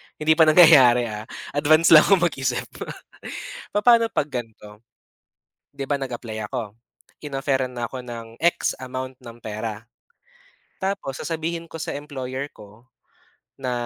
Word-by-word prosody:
hindi 155 +1 +1
pa 160 0 +5
nangyayari 130 -8 +7
ah, 105 +1 -7 0.2
advance 155 +3 +4
lang 155 -2 +9
ako 195 -3 +4
mag-isip. 130 -7 0 1.1
Papa'no 230 +2 +5
pag 145 - 0
gan'to. 110 -4 -7 1.0
'Di 140 - -6
ba 145 -1 +1
nag-apply 115 -5 -5
ako, 110 -2 -5 0.5
inofferan 135 -2 -1
na 120 -1 -3
ako 130 -1 -6
ng 115 -1 -7 0.2
x 170 0 +2
amount 130 0 -6
ng 120 -2 -12
pera. 110 0 -5 1.0
Tapos 190 -8 -3
sasabihin 165 +1 -4
ko - - -9
sa - - -3
employer 140 -1 -5
ko 105 +4 -16 0.7
na 130 -2 -2
130 Hz, 130 wpm, -23 LUFS, 120-155 Hz, 1.1 s, lang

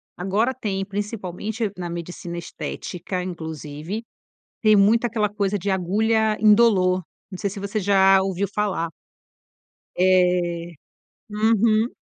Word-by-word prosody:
agora 205 +8 0
tem, 195 -6 -3
principalmente 205 +1 -4
na 175 -1 -4
medicina 170 0 -6
estética, 180 +1 -5
inclusive, 160 +3 -6 0.6
tem 215 -1 +6
muita 220 +4 +4
aquela 210 -3 0
coisa 205 -1 -1
de 200 +2 -3
agulha 215 +4 +1
indolor, 205 -4 +4 0.3
não 185 - -6
sei 200 - -2
se 200 +1 -7
você 200 +2 -2
já 195 0 +5
ouviu 195 +1 -1
falar. 195 -5 -1 1.1
É, 180 -2 +2 0.6
uhum. 220 +1 +3
195 Hz, 115 wpm, -23 LUFS, 180-215 Hz, 1.1 s, tem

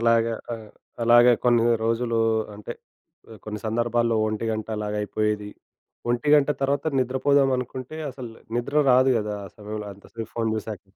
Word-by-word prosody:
అలాగ 115 0 +3 0.3
ఆహ్, 110 -2 -7 0.3
అలాగే 120 +1 +7
కొన్ని 120 -2 +4 0.2
రోజులు 115 0 0 0.4
అంటే 105 0 -7 0.6
ఆహ్, 110 - -11
కొన్ని 105 0 -5
సందర్భాల్లో 115 +1 +1
ఒంటిగంట 110 0 -2
అలాగయిపోయేది. 105 0 -2 0.6
ఒంటిగంట 145 +4 +3
తర్వాత 140 +1 0
నిద్రపోదాం 135 +2 +2
అనుకుంటే 130 +3 -6
అసలు 125 -2 -8 0.3
నిద్ర 120 +5 -2
రాదు 130 +1 +5
గదా! 105 -1 -3
అసలు. 105 +3 -12 0.2
అంత 100 - -18
సేపు 115 -1 -6
ఫోన్ 115 -1 0
చూసాక. 110 -1 -5
115 Hz, 130 wpm, -24 LUFS, 110-125 Hz, 0.6 s, అలాగే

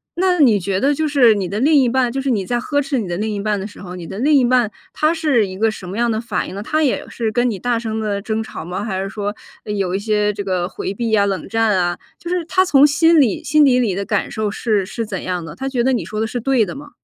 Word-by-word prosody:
那 360 0 +1
你 235 -8 +5
觉 190 0 -1
得 280 +5 +2
就 310 +2 -1
是 265 -6 +5
你 190 -3 -2
的 205 - -3
另 295 +6 +3
一 265 -4 +4
半 250 -1 +1
就 270 - -2
是 270 - -2
你 210 -6 0
在 240 +4 -1
呵 285 +4 0
斥 275 -2 -1
你 205 - -3
的 175 0 -3
另 215 +1 -2
一 205 - -3
半 210 0 -1
的 190 - -5
时 205 - -14
候， 180 -1 -8
你 175 -2 -8
的 195 - -7
另 290 +5 +2
一 265 -3 +5
半 240 -3 +2 0.2
他 310 +2 +2
是 295 -10 +1
一 185 0 -8
个 225 +2 +2
什 185 -4 -9
么 195 - -5
样 240 0 +1
的 220 -1 -1
反 220 -6 -3
应 - - -8
呢？ 200 - -5
他 310 +7 0
也 275 - 0
是 225 -2 -2
跟 245 +1 +1
你 200 - -4
大 245 +2 0
声 220 -1 -3
地 205 -2 -2
争 220 +1 -2
吵 220 - -7
吗？ 180 +4 -4
还 190 -4 -2
是 195 - -4
说 205 +1 -4 0.3
呃 210 - -4
有 190 -3 -1
一 195 - 0
些 210 0 +1
这 200 0 -5
个 185 -2 -1
回 190 - -4
避 230 +3 -2
呀、 205 -2 +4
冷 195 -2 -2
战 225 -2 +2
啊？ 175 -1 0 0.2
就 345 - -7
是 355 -2 -1
他 370 +3 +2
从 285 -5 +6
心 325 +2 +4
里 245 -9 +2
心 300 +2 +4
底 250 -2 +4
里 220 -7 0
的 200 +1 -3
感 205 -2 -1
受 215 -1 -2
是 210 -3 0
是 230 +4 -4
怎 195 -3 -5
样 180 -2 -3
的？ 165 0 -9
他 270 +6 -4
觉 250 -3 0
得 265 - +2
你 240 - -1
说 215 0 -4
的 225 - 0
是 245 +2 -4
对 245 -2 +2
的 175 - -7
吗？ 290 +1 -10
220 Hz, 330 characters per minute, -19 LUFS, 200-265 Hz, 0.3 s, 从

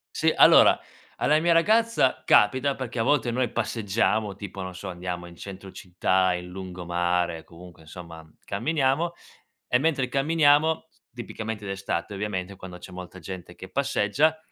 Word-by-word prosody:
Sì, - - +3
allora - - +7 0.4
alla 150 +1 +3
mia 170 +1 +3
ragazza 215 - +3
capita 130 +6 +4
perché, 130 -2 -5
a - - +2
volte, 125 -2 +2
noi 125 -1 -1
passeggiamo 110 -2 0
tipo 100 -1 -8
non 95 0 -6
so 95 +2 -7
andiamo 90 -1 -5
in 85 - -13
centro 95 +1 -9
città, 95 -1 0
in 90 0 -5
lungomare, 90 -2 -2
comunque 85 -1 -14
insomma 80 0 -11 0.2
camminiamo 150 +7 0 0.5
e 125 - +3
mentre 140 -3 +1
camminiamo, 155 +3 +3 0.3
tipicamente 110 -2 -6
d'estate 95 -1 -3
ovviamente 100 -1 -4
quando 90 -1 -10
c'è 90 - -12
molta 90 0 -9
gente 90 -2 -9
che 95 +1 -10
passeggia, 140 +5 +1
100 Hz, 145 wpm, -25 LUFS, 90-135 Hz, 0.5 s, allora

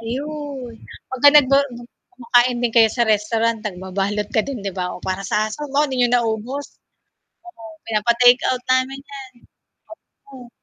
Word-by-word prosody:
Ayun 275 +1 -6 0.4
'pag 260 - -6
ka 290 - +9
nag 285 -3 +6
go 275 - +6 0.5
kumakain 245 0 +1
din 235 - 0
kayo 225 -1 +7
sa 235 -3 0
restaurant 225 +2 0
nagbabalot 200 +1 -3
ka - - +5
din, 275 -4 -5
'di 195 -1 -5
ba, 180 - -1
o - - -10
para 185 +1 -3
sa - - +1
aso 215 - -8
mo 290 +2 +3
hindi 265 -3 -4
niyo 245 - +3
naubos 240 +4 -1 0.8
oo, 295 -10 -14 0.2
pinapa-take-out 245 +3 +2
namin 260 +1 0
yan. 270 -2 -9 1.0
Oo. 255 -3 -13
240 Hz, 160 wpm, -20 LUFS, 220-265 Hz, 1.0 s, ka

